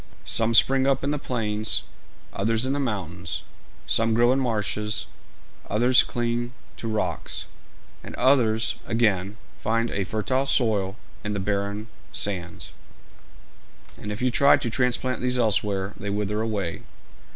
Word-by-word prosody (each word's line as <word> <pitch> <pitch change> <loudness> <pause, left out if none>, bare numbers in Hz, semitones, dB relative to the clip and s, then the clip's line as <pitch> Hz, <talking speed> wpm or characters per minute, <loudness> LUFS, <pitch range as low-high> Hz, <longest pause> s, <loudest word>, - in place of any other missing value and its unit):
Some 115 0 +2
spring 135 +2 +5
up 135 -1 +2
in 140 - +1
the 150 - -1
plains, 110 -5 -1 0.5
others 110 +4 +1
in 135 - 0
the 145 - -1
mountains; 90 - -3 0.4
some 115 0 +2
grow 120 +1 +5
in 135 - +1
marshes, 105 -3 -1 0.6
others 120 +5 +5
cling 120 +1 -2 0.2
to 115 - -5
rocks; 110 -1 -2 0.6
and - - -8
others, 120 -4 +3
again, 105 -3 +1 0.2
find 115 +2 0
a 100 - -1
fertile 120 +8 0
soil 110 -7 +2 0.3
in 105 - -2
the 100 - -1
barren 100 +2 -1 0.3
sands; 90 -4 -4 1.2
and 105 - -6
if 105 +4 -4
you 125 - +3
try 140 +3 +6
to 130 -5 -3
transplant 125 +1 0
these 125 0 +1
elsewhere, 105 -4 +1
they 100 - -5
wither 105 +1 -1
away. 100 -7 -2
110 Hz, 140 wpm, -25 LUFS, 105-125 Hz, 1.2 s, try